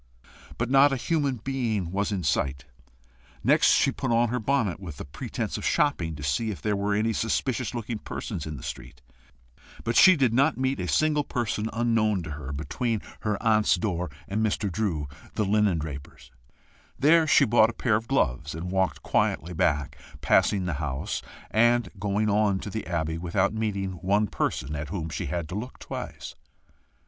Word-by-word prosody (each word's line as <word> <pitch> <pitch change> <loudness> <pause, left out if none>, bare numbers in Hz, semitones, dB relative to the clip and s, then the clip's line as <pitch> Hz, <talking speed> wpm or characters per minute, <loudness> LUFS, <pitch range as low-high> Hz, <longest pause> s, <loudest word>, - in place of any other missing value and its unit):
But 115 +2 -2
not 140 +1 +6
a - - +1
human 145 -1 0
being 115 -10 -1
was 100 +2 -1
in 95 -3 -2
sight. 70 -2 0 0.8
Next - - +4
she - - +4
put - - -3
on 115 0 +3
her 125 +2 -1
bonnet, 115 -5 0
with 85 -7 -8
the - - -7
pretence 70 - -4
of - - -8
shopping, 85 - +1
to 75 - -8
see 70 +11 0
if 100 - -5
there 105 -1 0
were 100 +1 0
any 110 +2 +1
suspicious 125 +3 -1
looking 115 -1 -4
persons 90 -7 -5
in 75 -1 -5
the - - -10
street. 75 - -8 0.8
But 115 - -1
she 185 -1 +8
did 130 -7 +2
not 140 +5 +3
meet 130 -2 0
a 90 - -2
single 150 - +2
person 110 -4 -2
unknown 115 -5 +1
to 80 - -6
her 70 -2 -6
between 105 - -2 0.2
her 105 -2 -1
aunt's 110 -3 +4
door 90 -2 -2 0.2
and 105 +3 -1
Mr. 105 -2 0
Drew 85 -8 -1 0.3
the 105 - +1
linendraper's. 85 -12 -1 0.7
There 160 +3 +5
she - - +6
bought 110 0 +5
a - - -5
pair 115 -2 +1
of 110 +2 -2
gloves, 75 - 0
and 90 +3 -5
walked 95 -1 0
quietly 90 +2 0
back, 75 -2 0 0.2
passing 95 -3 +3
the 85 - -1
house, 70 -3 -3 0.3
and 120 +2 +3
going 105 +1 0
on 105 -1 +2
to 105 - -6
the 110 -2 -4
Abbey, 80 -2 -2
without 95 +4 0
meeting 100 -3 -2
one 95 +4 +1
person 75 -7 -2
at 75 0 -5
whom 80 -3 -4
she - - -4
had 85 +2 -3
to - - -6
look 115 +6 -5
twice. - - -7
105 Hz, 180 wpm, -26 LUFS, 85-115 Hz, 0.8 s, she